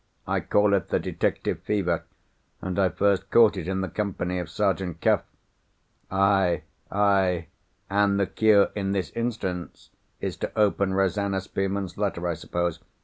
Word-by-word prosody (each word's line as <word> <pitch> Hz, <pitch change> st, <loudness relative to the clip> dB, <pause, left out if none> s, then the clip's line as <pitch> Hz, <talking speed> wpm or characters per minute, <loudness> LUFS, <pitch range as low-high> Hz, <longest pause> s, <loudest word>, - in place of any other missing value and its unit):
I -, -, +1 dB
call 105 Hz, 0 st, +2 dB
it 95 Hz, -3 st, +1 dB
the -, -, +2 dB
detective -, -, -1 dB
fever; 90 Hz, -5 st, -1 dB, 0.5 s
and 95 Hz, +1 st, -3 dB
I 95 Hz, -2 st, +4 dB
first 100 Hz, +1 st, +1 dB
caught 115 Hz, -3 st, +6 dB
it 90 Hz, -3 st, -5 dB
in 95 Hz, 0 st, -1 dB
the 95 Hz, -, -1 dB
company 90 Hz, -2 st, -2 dB
of 90 Hz, -3 st, -5 dB
Sergeant 95 Hz, -2 st, -1 dB
Cuff." -, -, +3 dB, 0.9 s
"Aye! 95 Hz, -4 st, +2 dB, 0.3 s
aye! 95 Hz, -5 st, +2 dB, 0.4 s
and 100 Hz, 0 st, +2 dB
the 100 Hz, -, +3 dB
cure 105 Hz, 0 st, +4 dB
in 100 Hz, -1 st, -1 dB
this 95 Hz, -2 st, -2 dB
instance 110 Hz, -7 st, -4 dB, 0.3 s
is -, -, -3 dB
to -, -, -3 dB
open 100 Hz, -2 st, +2 dB
Rosanna 95 Hz, 0 st, +1 dB
Spearman's 95 Hz, -1 st, -3 dB
letter, 95 Hz, -4 st, -1 dB
I 85 Hz, -, 0 dB
suppose? 85 Hz, +1 st, -2 dB
95 Hz, 150 wpm, -26 LUFS, 90-100 Hz, 0.9 s, caught